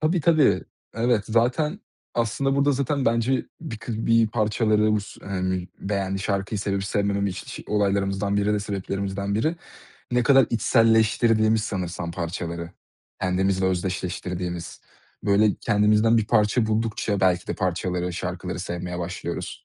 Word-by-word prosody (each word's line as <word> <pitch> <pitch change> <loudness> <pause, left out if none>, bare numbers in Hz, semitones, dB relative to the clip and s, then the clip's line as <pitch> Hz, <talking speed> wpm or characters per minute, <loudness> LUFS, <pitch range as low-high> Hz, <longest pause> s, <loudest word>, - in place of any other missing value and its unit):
Tabii, 160 +3 +1
tabii. 155 -3 +4 0.3
Evet. 115 -2 +1
Zaten 140 - +1 0.3
aslında 135 +4 0
burada, 140 +1 +3
zaten 140 0 0
bence, 115 +3 +1
bir 145 -10 -6
kı 110 -1 -4
bir 115 -1 +4
parçaları 110 -1 +2
bu 105 - +2
s 100 - -12
hani, 95 -2 -2
beğendiği 95 -1 -2
şarkıyı 100 +1 -1
sevip 100 -1 -1
sevmemem 100 0 0
iş 90 -1 -6
olaylarımızdan 100 -1 0
biri 100 +1 +2
de 105 - +1
sebeplerimizden 100 0 -3
biri. 155 +10 0 0.6
Ne 125 0 +3
kadar 135 -2 +5
içselleştirdiğimiz 110 -1 +3
sanırsam 90 -4 -3
parçaları, 85 -1 -4 0.5
kendimizle 95 +1 +1
özdeşleştirdiğimiz. 90 -1 -3 0.4
Böyle, 100 +1 +4
kendimizden 105 +1 +3
bir 105 - 0
parça 110 +1 +2
buldukça 110 -2 -1
belki 90 -2 +2
de - - -2
parçaları, 90 -1 -1
şarkıları 90 0 -4
sevmeye 90 -1 -4
başlıyoruz. 85 0 -4
100 Hz, 130 wpm, -24 LUFS, 95-115 Hz, 0.6 s, kadar